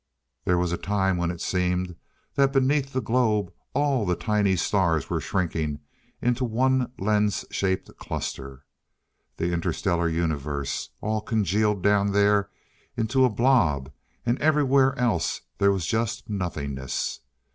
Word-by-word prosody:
There 90 - +3
was 90 -1 0
a 85 - -1
time 95 -2 +1
when 85 -1 0
it 85 -1 -5
seemed 90 -1 -1 0.4
that 135 -1 +3
beneath 135 +1 +2
the 130 -2 -2
globe 110 -5 +1 0.2
all 140 -4 +2
the 90 -3 +1
tiny 105 -2 +1
stars 85 -4 +1
were - - 0
shrinking 80 -5 -1 0.4
into 125 +1 +1
one 125 +2 +1
lens 105 -1 +1
shaped 95 -1 -1
cluster. 70 0 -6 0.7
The 85 +1 -1
Inter 85 -1 0
stellar 85 -1 0
Universe 75 -4 -2
all 110 0 -1
congealed 105 -2 +1
down 100 -1 +3
there 100 -1 +3 0.5
into 120 +4 +3
a - - +3
blob, 105 - +2 0.3
and 120 +3 0
everywhere 140 -3 +3
else 120 -4 0 0.2
there 100 0 +5
was 95 -4 -1
just 115 +4 -1
nothingness.... 70 - -3
100 Hz, 135 wpm, -25 LUFS, 85-120 Hz, 0.7 s, there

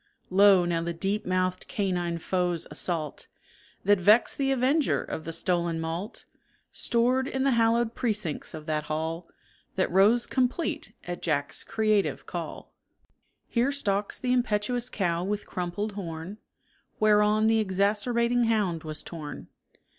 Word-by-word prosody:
Lo! 195 -1 +6
now 170 -1 0
the 170 0 -3
deep 195 +4 -2
mouthed 185 0 0
canine 180 -6 -1
foe's 175 0 -1
assault, 160 -5 -3 0.6
That 205 0 +4
vexed 210 +9 +4
the 270 -1 +2
avenger 270 +4 +2
of 160 - -6
the 165 - -4
stolen 170 -1 0
malt, 165 +7 -5 0.5
Stored 250 +3 +1
in 265 -1 -1
the 275 - +3
hallowed 230 0 +2
precincts 210 - -2
of 155 -1 -9
that 155 -1 -1
hall 160 +2 -3 0.5
That 185 - 0
rose 210 +6 +4
complete 260 +6 -1
at 175 0 -6
Jack's 145 -4 -1
creative 215 -2 0
call. - - -7 0.7
Here 245 +3 +1
stalks 205 -7 -1
the 250 -1 0
impetuous 245 0 0
cow 175 -6 -1
with 205 +2 -2
crumpled 180 +4 -3
horn 180 0 -6 0.6
Whereon 210 0 +4
the 225 0 +4
exacerbating 220 +5 +1
hound 205 -8 0
was 155 -1 -4
torn. 155 -3 -8
200 Hz, 135 wpm, -27 LUFS, 170-230 Hz, 0.7 s, Lo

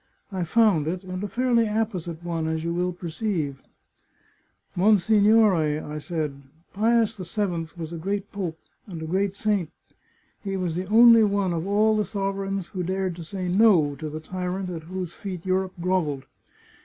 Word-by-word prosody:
I 185 -3 -2
found 190 -5 +3
it, 180 +3 -3
and 185 +1 -5
a - - -1
fairly 235 0 +2
apposite 185 -7 -2
one, 165 -2 -2
as 160 0 -2
you 170 0 -1
will 180 +1 0
perceive. 170 -5 -3 0.4
" - - -33
' - - -40
" - - -42
Monsignore," 210 +2 +5
I 150 -2 -1
said, 150 -4 -4 0.2
" 165 - -35
Pius 225 +1 +2
VII 180 -3 -2
was 165 0 -6
a 165 - -5
great 200 +3 -3
Pope, 180 -5 -4 0.3
and 175 -5 -7
a - - -5
g^reat 195 +3 0
saint. 205 -6 0 0.7
He 195 -2 -2
was 180 -3 -2
the 180 +3 -3
only 230 +1 +7
one 200 -3 +1
of 165 +2 -3
all 215 +2 +3
the 210 - +2
sovereigns 195 -2 -3
who 185 -3 -4
dared 185 0 -2
to 170 - -7
say 185 +2 -5
No 180 -6 +4
to 155 -1 -5
the 155 +1 -5
tyrant 180 +3 -4
at 165 -2 -6
whose 185 -2 -4
feet 185 -4 -7
Europe 185 0 0
grovelled. 165 -7 -1
185 Hz, 180 wpm, -25 LUFS, 165-205 Hz, 0.7 s, only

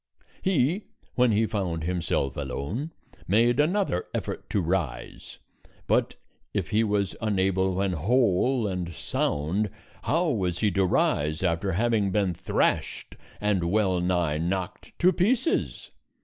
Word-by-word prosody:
He, 180 - +1 0.3
when 125 -1 +3
he 110 +2 +3
found 95 -7 -2
himself 80 -6 -1
alone, 75 - -4 0.4
made 115 +7 +3
another 170 - +1
effort - - -4
to - - +1
rise; 85 -5 -3 0.5
but - - +1 0.4
if - - -2
he 110 +2 +3
was 105 -2 0
unable 95 -3 +1
when 95 0 0
whole 115 - +2
and 90 -3 -3
sound, 85 +9 -1 0.3
how 165 +1 +1
was 90 -7 -1
he 105 +1 +1
to 95 +1 +2
rise 75 -2 +1
after 95 +2 0
having 110 0 +1
been 95 -2 +1
thrashed 90 +2 -1 0.2
and 105 -4 +1
well 95 -2 +2
nigh 90 -4 0
knocked 90 +2 -3
to 180 +2 +4
pieces! 245 - 0
95 Hz, 130 wpm, -26 LUFS, 90-115 Hz, 0.5 s, to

